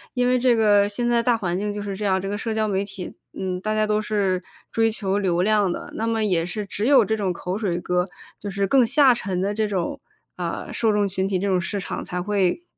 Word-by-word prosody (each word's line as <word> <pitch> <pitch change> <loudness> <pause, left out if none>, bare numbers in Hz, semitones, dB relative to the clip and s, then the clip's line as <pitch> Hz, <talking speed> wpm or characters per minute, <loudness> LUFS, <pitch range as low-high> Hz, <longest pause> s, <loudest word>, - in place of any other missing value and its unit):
因 250 0 +2
为 250 0 +3
这 245 -1 +4
个 205 -2 +4
现 240 +4 -1
在 235 -1 +3
大 240 -2 +3
环 180 -3 -2
境 205 +1 -2
就 205 - -4
是 200 -1 -4
这 210 - -6
样， 190 -1 +2
这 195 - -4
个 205 +1 -2
社 225 0 -3
交 220 0 0
媒 195 -1 0
体， 195 -2 -8 0.2
嗯， 185 -1 -3
大 215 +1 -1
家 215 0 +2
都 215 0 +1
是 195 -4 0 0.3
追 225 0 +2
求 200 -2 -1
流 180 -3 +1
量 205 -2 +3
的， - - -6
那 225 - -2
么 225 -1 0
也 170 -5 +1
是 205 +4 -4
只 205 +2 -3
有 265 -6 +6
这 220 - 0
种 200 -4 -1
口 180 +2 -4
水 185 -6 -1
歌 180 0 0 0.3
就 205 - -5
是 195 0 0
更 260 +2 +5
下 265 +1 +5
沉 190 -6 -3
的 200 +2 0
这 215 0 0
种， 190 -4 -3 0.4
呃， - - -4
受 225 -2 +2
众 205 -1 +2
群 190 0 -1
体、 195 -1 0
这 200 - -1
种 185 -2 +2
市 200 +3 -3
场 - - -5
才 180 - -4
会 200 - 0
205 Hz, 275 characters per minute, -23 LUFS, 190-220 Hz, 0.4 s, 有